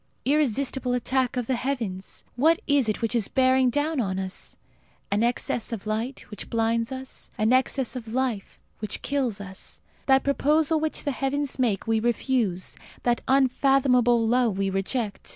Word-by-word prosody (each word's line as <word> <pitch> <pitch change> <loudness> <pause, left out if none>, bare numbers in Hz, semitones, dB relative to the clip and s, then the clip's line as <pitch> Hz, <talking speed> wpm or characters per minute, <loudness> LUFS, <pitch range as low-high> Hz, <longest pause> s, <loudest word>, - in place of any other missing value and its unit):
Irresistible 265 -2 +1
attack 255 +1 0
of 245 - -1
the 260 - 0
heavens! 235 -7 -3
What 320 +7 +4
is 285 -6 +3
it 215 - -2
which 230 - 0
is 230 -4 +1
bearing 260 -1 +3
down 290 +4 0
on 190 -5 -1
us? 190 0 -5 0.5
An 205 +1 +2
excess 235 0 0
of 220 -3 -5
light, 225 +5 -3
which 210 - -8
blinds 230 +1 0
us; 260 0 -5
an 215 +3 +2
excess 260 0 +1
of 240 -3 -6
life, 240 -3 -2 0.2
which 215 - -4
kills 260 -8 -1
us. 190 -1 -6 0.2
That 265 -1 +5
proposal 300 +3 +2
which 315 0 -2
the 285 - 0
heavens 275 +1 -2
make 225 -7 +1
we 225 -1 +2
refuse; 235 -5 0 0.3
that 240 -1 +1
unfathomable 255 -3 +3
love 235 -4 +2
we 195 -1 0
reject. 200 +2 -3
245 Hz, 160 wpm, -25 LUFS, 220-270 Hz, 0.5 s, That